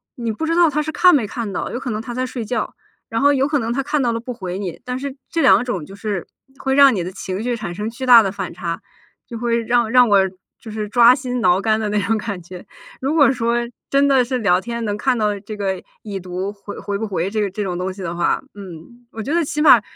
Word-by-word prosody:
你 235 -2 -3
不 320 +9 -3
知 330 - +1
道 345 -1 +6
他 300 0 0
是 310 +1 -3
看 360 +3 +5
没 245 -7 +2
看 215 -1 -5
到， - - -3
有 245 - -3
可 255 -2 -4
能 215 0 -3
他 235 +1 -7
在 255 +1 -1
睡 250 -2 -5
觉， 220 0 -3 0.3
然 225 0 -2
后 285 +1 +5
有 275 -1 +2
可 295 -1 +1
能 230 -1 -2
他 275 +3 -1
看 295 +1 0
到 240 -2 +1
了 230 - -2
不 245 +2 -6
回 185 -5 -5
你， 190 -4 -5
但 250 0 -4
是 275 0 -5
这 330 - 0
两 195 +4 +6
种 195 -11 -3
就 195 - -12
是 200 -3 -3 0.3
会 265 0 -1
让 275 -2 +7
你 180 - -1
的 180 - -5
情 190 +2 -5
绪 245 0 -1
产 205 -6 -6
生 210 +3 -3
巨 240 +3 -8
大 235 -2 +9
的 195 - -1
反 200 0 -5
差， 170 -1 -4 0.5
就 235 - -7
会 235 0 0
让 235 0 +1
让 250 -1 +6
我 200 -1 +6 0.4
就 220 - -10
是 210 -1 -4
抓 240 +2 +7
心 255 -2 -3
挠 185 -4 +3
肝 220 +1 +2
的 215 -1 -2
那 205 0 +1
种 220 +3 +1
感 205 -4 -5
觉。 180 +1 -11 0.3
如 275 +3 -1
果 290 -4 +5
说 235 -2 0 0.3
真 280 +1 +3
的 270 -2 +4
是 255 +1 -2
聊 180 -5 +3
天 235 +2 -4
能 205 -1 -1
看 255 +3 +1
到 210 -2 0
这 210 +2 -8
个 190 -2 -2 0.2
已 200 -3 -5
读 185 +2 -4
回 205 0 -9
回 200 +1 -4
不 220 +2 -3
回 180 -3 -1
这 215 0 0
个 205 - 0
这 205 +3 -4
种 185 -3 -3
东 185 +1 -2
西 195 - -10
的 170 -1 -3
话， 175 - +1
嗯， 200 +5 -12
我 220 - -6
觉 285 - -3
得 340 0 +3
起 295 +1 -2
码 255 -7 +8
225 Hz, 295 characters per minute, -20 LUFS, 200-255 Hz, 0.5 s, 大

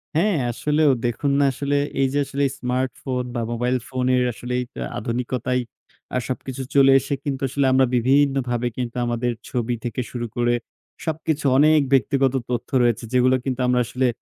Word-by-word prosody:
হ্যাঁ, 185 +1 +2
আসলেও 150 +4 +2
দেখুন 120 +4 0
না 140 - +4
আসলে 140 +2 -1 0.2
এই 135 - +4
যে 145 - +1
আসলে 140 +1 -2 0.2
স্মার্টফোন 125 0 -2
বা 120 - -1
মোবাইল 125 +2 0
ফোনের 130 -1 +1
আসলে 120 +3 -6
এই - - -4 0.3
আধুনিকতায় 125 +2 -1 0.5
আ - - +3
সবকিছু 130 +1 -4
চলে 135 -1 +7
এসে 135 +2 -4
কিন্তু 135 -2 -2
আসলে 140 +2 0
আমরা 130 0 +5
বিভিন্নভাবে 130 -1 +2
কিন্তু 120 -2 -3
আমাদের 120 +1 -1 0.2
ছবি 120 0 -1
থেকে 120 +1 -2
শুরু 120 -1 -3
করে 120 0 +2 0.5
সবকিছু 160 -2 -2
অনেক 155 +2 +5
ব্যক্তিগত 135 +1 +3 0.2
তথ্য 120 -1 -2
রয়েছে, 120 -2 +1
যেগুলো 125 +1 +4
কিন্তু 130 -1 -2
আমরা 125 0 +3
আসলে 130 +2 0
130 Hz, 160 wpm, -22 LUFS, 120-140 Hz, 0.5 s, চলে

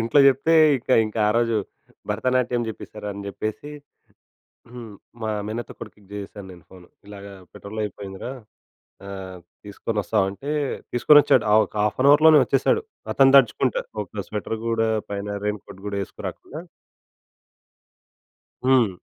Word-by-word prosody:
ఇంట్లో 115 +6 +3
జెప్తే 140 +4 +3 0.2
ఇక 125 - -12 0.2
ఇంకా 110 +1 -4
ఆరోజు 115 0 +1 0.5
భరతనాట్యం 125 +2 0
జేప్పేసారు 105 -1 -8
అని 100 0 -8
చెప్పేసి. 110 +8 -5 1.0
హ్మ్. 120 -3 -9 0.3
మా 110 - -2 0.2
మేనత్త 110 +1 -5
కొడుకుకి 105 -2 -12
జేశాను 100 -1 -8
నేను 90 -2 -15
ఫోన్. 90 -2 -14 0.2
ఇలాగ 100 -1 -10 0.3
పెట్రోల్ 110 +2 -6
అయిపోయిందిరా 100 +3 -7 0.8
ఆహ్, 95 -2 -8 0.3
తీసుకొని 105 +2 -5
వస్తావా? 105 +1 +1
అంటే 135 +9 -7 0.4
తీసుకొచ్చాడు. 145 +4 +5
ఆహ్, 110 +1 +6
ఒక - - -15
హాఫ్ 105 0 -1
అన్ 140 - +5
అవర్‌లోనే 155 +1 +7
వచ్చేసాడు. 135 - +1 0.3
అతను 135 0 +5
తడుచుకుంటా 130 -1 +3 0.2
ఒక 100 0 -7
స్వెటర్ 105 +1 -4
గూడా 115 -1 +1 0.2
పైన 100 0 -4 0.2
రెయిన్ 105 -1 -2
కోట్ 95 - -13
గూడా 100 -1 -3
యేసుకురాకుండా. 145 - -8 2.0
హ్మ్. 130 -4 +4
110 Hz, 130 wpm, -23 LUFS, 100-125 Hz, 2.0 s, అవర్‌లోనే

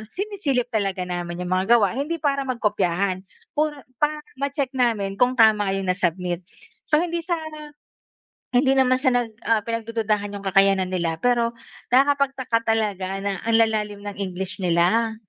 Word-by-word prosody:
sinisilip 330 - -1
talaga 195 -4 -1
namin 175 0 -4
'yong 180 - -5
mga 190 +6 +4
gawa 205 -5 +3
hindi 295 +6 -2
para 275 -1 0
magkopyahan. 200 -6 0 0.3
Puro 300 0 0 0.2
para 300 0 0 0.2
ma-check 280 -1 -1
namin 215 -6 0
kung 250 +1 +3
tama 210 -4 +4
'yong 190 -1 0
nasubmit. 180 -1 -1 0.5
So, - - +3
hindi 340 -1 -2
sa 345 +1 -1 1.2
hindi 265 +2 +3
naman 255 -1 +3
sa 265 - -1
nag, 240 -2 0 0.2
ah, 225 -2 +3
pinagdududahan 220 -3 -2
yung 200 - -7
kakayanan 195 -1 +3
nila, 170 -3 -1
pero 235 -1 +2 0.3
nakakapagtaka 265 -3 +2
talaga 195 -3 -2
na 195 -2 -2
ang 230 - +3
lalalim 210 -2 0
ng 205 0 -7
English 190 0 -4
nila, 185 +6 +2
220 Hz, 150 wpm, -23 LUFS, 195-255 Hz, 1.2 s, mga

